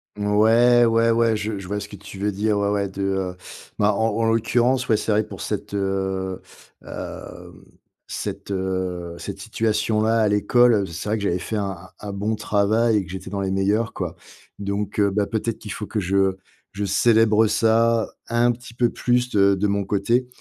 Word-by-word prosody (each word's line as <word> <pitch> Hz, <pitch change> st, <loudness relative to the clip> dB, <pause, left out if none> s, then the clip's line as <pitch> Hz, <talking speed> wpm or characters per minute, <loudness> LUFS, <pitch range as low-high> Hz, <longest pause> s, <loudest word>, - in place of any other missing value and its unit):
Ouais, 110 Hz, +4 st, +4 dB
ouais, 115 Hz, 0 st, +3 dB
ouais, 115 Hz, -1 st, +3 dB
je 105 Hz, -1 st, -3 dB
je 95 Hz, -, -9 dB
vois 105 Hz, +2 st, -2 dB
ce 100 Hz, -, -7 dB
que 105 Hz, -, -10 dB
tu 100 Hz, 0 st, -11 dB
veux 105 Hz, +2 st, -1 dB
dire, 105 Hz, +2 st, 0 dB
ouais, 100 Hz, 0 st, +1 dB
ouais, 100 Hz, -1 st, 0 dB
de 100 Hz, +1 st, -5 dB
heu, 95 Hz, -2 st, -2 dB, 0.4 s
bah, 105 Hz, +1 st, +3 dB
en 110 Hz, +3 st, +1 dB
en 115 Hz, -, +1 dB
l'occurrence, 120 Hz, +3 st, +2 dB
ouais, 110 Hz, -, +4 dB
c'est 110 Hz, -, -2 dB
vrai 105 Hz, +1 st, +3 dB
que -, -, -16 dB
pour -, -, -8 dB
cette, 105 Hz, 0 st, -4 dB
heu, 95 Hz, -1 st, -2 dB, 0.4 s
hem, -, -, -9 dB, 0.4 s
cette, -, -, -5 dB
heu, 95 Hz, -2 st, -3 dB
cette 100 Hz, -1 st, -7 dB
situation-là 110 Hz, +1 st, 0 dB
à 110 Hz, -, +3 dB
l'école, 105 Hz, 0 st, +3 dB
c'est 85 Hz, +5 st, -6 dB
vrai 110 Hz, -, +1 dB
que 100 Hz, -, -5 dB
j'avais 90 Hz, -2 st, +1 dB
fait 110 Hz, -, -5 dB
un 100 Hz, -3 st, -3 dB, 0.2 s
un 105 Hz, -1 st, -6 dB
bon 105 Hz, +3 st, -1 dB
travail 110 Hz, +2 st, +2 dB
et 95 Hz, -, -1 dB
que 85 Hz, -, -10 dB
j'étais 95 Hz, 0 st, -7 dB
dans 100 Hz, 0 st, -3 dB
les 95 Hz, -1 st, -1 dB
meilleurs, 100 Hz, +4 st, 0 dB
quoi. -, -, -4 dB, 0.4 s
Donc 100 Hz, +1 st, -3 dB
heu, 100 Hz, -1 st, +3 dB
bah, 100 Hz, 0 st, 0 dB
peut-être 115 Hz, 0 st, -2 dB
qu'il 105 Hz, -, -8 dB
faut 105 Hz, -, -5 dB
que 105 Hz, +2 st, -3 dB
je 95 Hz, 0 st, +1 dB, 0.4 s
je 105 Hz, 0 st, -4 dB
célèbre 110 Hz, +1 st, +4 dB
ça 115 Hz, +1 st, +2 dB, 0.2 s
un 120 Hz, +1 st, +3 dB
petit 120 Hz, -1 st, -9 dB
peu 120 Hz, 0 st, +2 dB
plus 125 Hz, +1 st, 0 dB
de 100 Hz, -3 st, +4 dB
de 100 Hz, +2 st, 0 dB
mon 100 Hz, 0 st, 0 dB
côté 115 Hz, +6 st, +1 dB
105 Hz, 200 wpm, -22 LUFS, 100-115 Hz, 0.4 s, Ouais